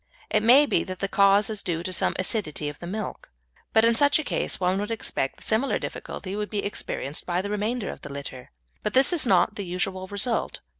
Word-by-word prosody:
It - - +3
may 250 +7 +7
be 175 - +1
that 185 0 -6
the 195 - -2
cause 200 +1 +4
is 215 -2 -3
due 170 -2 -2
to 185 - -3
some - - +1
acidity 185 -6 -2
of 145 - -10
the 175 - -7
milk, 210 +4 -5 0.4
but 220 0 +5
in 230 - +5
such 285 +5 +4
a 310 - -2
case - - -1
one 185 +1 +1
would 205 +1 -3
expect 220 -11 -1
that - - -13
similar 225 +5 +1
difficulty 190 +1 -6
would 210 0 -3
be 205 -2 -2
experienced 150 -7 -3
with 180 +1 0
the 205 - -4
remainder 210 +1 -2
of - - -11
the - - -8
litter, 140 -2 -7 0.3
but 210 - -3
this 265 +6 +6
is 310 -7 +2
not 190 +1 +4
the 200 - -3
usual 185 +1 -3
result. 210 +5 -1
200 Hz, 230 wpm, -25 LUFS, 180-220 Hz, 0.4 s, may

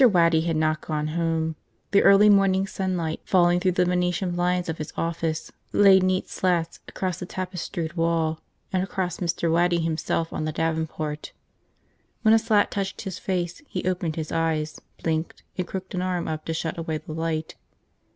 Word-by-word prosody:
WADDY 170 -8 +5
had 165 - +1
not 155 0 +1
gone 155 -1 -2
home. 160 -1 0 0.4
The 200 - +5
early 200 +1 +7
morning 195 -2 +4
sunlight, 180 -5 -2
falling 175 -1 +4
through 185 0 +1
the 180 0 +3
Venetian 180 +1 0
blinds 180 +1 0
of 160 -1 -3
his 155 - -5
office, 165 -1 -2 0.2
laid 195 -2 +7
neat 185 0 +1
slats 175 -3 0
across 185 -2 -3
the 180 - -6
tapestried 180 -3 -4
wall 165 -2 +1 0.3
and 185 - +2
across 185 -2 -2
Mr. 170 -1 0
Waddy 170 +1 +3
himself 165 0 -1
on - - -2
the 155 - -1
davenport. 160 -1 -2 0.9
When 220 -1 +6
a 225 - +6
slat 220 -2 +2
touched 195 -1 -3
his 190 -3 -5
face 175 0 -2
he 180 -1 -3
opened 175 -4 -1
his 155 -2 -4
eyes, 160 -2 -1 0.2
blinked, 160 0 -2
and 180 -1 -2
crooked 190 -1 -6
an 180 - -1
arm 180 -2 -1
up 155 -1 -4
to 165 - -2
shut 165 +1 -3
away 160 -1 -2
the 155 +1 -8
light. 160 -1 -2
170 Hz, 175 wpm, -25 LUFS, 160-185 Hz, 0.9 s, early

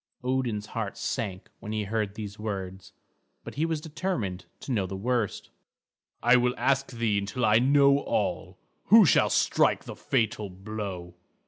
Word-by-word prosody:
Odin's 125 -5 -1
heart - - -5
sank 95 -4 -4
when 105 - -7
he 110 -1 -1
heard 105 -1 -2
these 105 -1 -7
words; 95 -3 -5 0.5
but - - -8
he 155 +3 0
was 160 -2 -1
determined 150 - -3 0.2
to - - -6
know 100 -6 0
the 95 - -6
worst. 115 +1 -2 0.7
"I 120 +1 +6
will 125 0 +1
ask 135 0 +1
thee 115 -4 0
until 110 +5 -2
I 110 +1 +5
know 140 +2 +5
all. - - -2 0.3
Who 220 -1 +8
shall - - +4
strike - - +2
the - - -8
fatal 110 -5 -1
blow?" 95 -2 -6
110 Hz, 155 wpm, -27 LUFS, 100-130 Hz, 0.7 s, Who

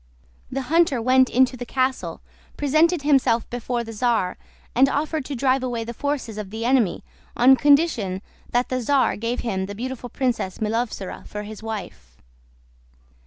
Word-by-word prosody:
The 270 0 -2
hunter 315 -1 +2
went 255 +2 +4
into 255 +1 +3
the 245 - -6
castle, 260 +1 -2 0.4
presented 310 +3 +2
himself 270 -6 +3
before 245 0 -2
the 225 0 -8
czar, 225 -5 +1 0.4
and 270 +2 +5
offered 305 0 -1
to 285 - -4
drive 260 +1 +2
away 245 -3 -2
the 235 +1 -6
forces 255 -5 -3
of 205 -2 -6
the 220 +3 -5
enemy 240 -8 +2 0.3
on 255 +2 +7
condition 280 - +2 0.3
that 245 +1 0
the 255 0 -1
czar 270 +2 +2
gave 230 +3 -2
him 190 -5 -2
the 205 - -7
beautiful 250 +2 -5
Princess 235 -7 -2
Milovzora 220 -3 -3
for 210 0 -6
his 215 0 -9
wife. 180 - -7
245 Hz, 160 wpm, -23 LUFS, 220-270 Hz, 0.4 s, on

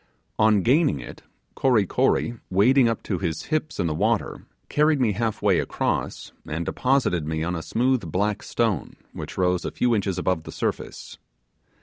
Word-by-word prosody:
On 105 -3 +4
gaining 135 - +3
it, - - -10 0.3
Kory 120 -6 +3
Kory, 120 +5 +1
wading 115 +7 +4
up 115 - -3
to 95 -4 -2
his 85 -4 -2
hips 155 -4 -2
in 95 - +1
the 80 - 0
water, 110 +7 -1 0.2
carried 150 0 +2
me 120 -4 +2
half 110 +2 -2
way - - +4
across, - - -2 0.2
and 80 +2 -3
deposited 125 - +1
me 80 0 -2
on 90 +2 -2
a 80 - -3
smooth 120 -4 0
black 100 +4 0
stone 115 -4 -1 0.2
which - - -7
rose 90 -1 +1
a - - -2
few 125 -1 +1
inches 100 -4 0
above 90 -2 0
the - - -9
surface. - - -4
105 Hz, 170 wpm, -24 LUFS, 90-125 Hz, 0.3 s, On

